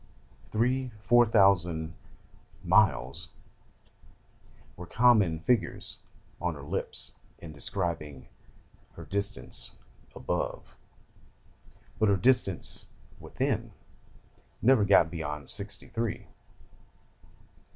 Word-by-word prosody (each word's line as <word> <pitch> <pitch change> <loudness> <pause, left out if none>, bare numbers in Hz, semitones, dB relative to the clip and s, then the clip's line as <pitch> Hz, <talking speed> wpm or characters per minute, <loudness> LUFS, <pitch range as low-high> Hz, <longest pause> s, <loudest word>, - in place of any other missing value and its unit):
Three, 125 +4 0
four 120 +3 +5
thousand 90 -7 +3 0.7
"miles" 65 +3 +2 1.5
were 90 - -9
common 105 -10 +3
figures 120 +4 -1 0.4
on 90 -2 -1
her 70 - -10
lips - - -3 0.2
in 85 - -10
describing 75 -4 -3 0.7
her 85 - -10
distance 100 +2 -3 0.4
"above"; - - -4 1.2
but 110 - +3
her 100 - +3
distance 95 - +1 0.3
"within" - - -2 0.9
never 120 -3 +4
got 90 -5 +5
beyond 75 -4 -5
sixty 100 +1 -1
three. 115 -1 -3
95 Hz, 80 wpm, -29 LUFS, 80-110 Hz, 1.5 s, four